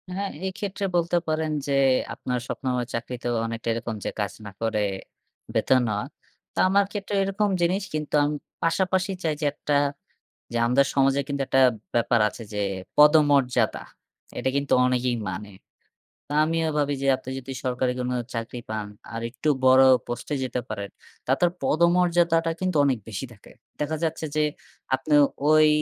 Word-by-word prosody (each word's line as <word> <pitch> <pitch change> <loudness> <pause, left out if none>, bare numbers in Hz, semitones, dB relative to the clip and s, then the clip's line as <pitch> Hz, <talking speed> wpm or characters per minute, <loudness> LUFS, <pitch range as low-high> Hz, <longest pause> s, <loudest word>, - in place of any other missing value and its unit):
হ্যাঁ, 200 0 -2
এই 190 - -1
ক্ষেত্রে 200 0 -3
বলতে 170 0 +2
পারেন 155 0 0 0.2
যে, 140 - 0 0.4
আপনার 125 -1 -3
স্বপ্নময় 125 -2 -2
চাকরিতেও 120 +1 -3
অনেকটা 115 0 -5
এরকম 115 -1 -4
যে - - -1
কাজ 100 -3 -1
না 100 - -7
করে 110 -2 0 0.7
বেতন 130 -1 +3
নেয়া। 105 -1 -1 0.5
তো - - -4
আমার 200 +1 +4
ক্ষেত্রে 205 -1 -4
এরকম 200 +1 0
জিনিস 185 +3 +1
কিন্তু 150 -1 -2
আমি 150 +1 0 0.3
পাশাপাশি 185 +3 +1
চাই 160 - +1
যে, 150 - 0
একটা 145 0 -1 0.8
যে 120 - -1
আমাদের 135 +3 +4
সমাজে 135 0 +3
কিন্তু 140 -1 -2
একটা 135 - +3 0.3
ব্যাপার 120 0 +3
আছে 115 - -10
যে 105 - -1 0.4
পদমর্যাদা, 145 -4 +4 0.5
এটা 130 - 0
কিন্তু 140 0 +1
অনেকেই 125 -1 +1
মানে। 100 +3 -6 0.8
তো - - -12
আমিও 165 0 0
ভাবি 145 -1 +1
যে 135 - 0
আপনি 130 - -10
যদি 135 +1 -9
সরকারি 125 0 0
কোনো 125 0 -1 0.2
চাকরি 115 +1 -4
পান 110 -1 -3 0.3
আর 115 - -4
একটু 140 +5 -2 0.2
বড় 130 +1 +7 0.2
পোস্টে 120 +5 -4
যেতে 125 0 -2
পারেন। 100 -2 -4 0.4
তাদের 155 +7 +3
পদমর্যাদাটা 170 0 +3
কিন্তু 185 -4 0
অনেক 135 -3 +2
বেশি 110 +5 -4
থাকে। 100 - -18 0.3
দেখা 150 +1 -1
যাচ্ছে 160 0 -1
যে 155 - +3 0.5
আপনি 135 +3 -3 0.4
ওই 155 0 +6
140 Hz, 160 wpm, -25 LUFS, 125-165 Hz, 0.8 s, বড়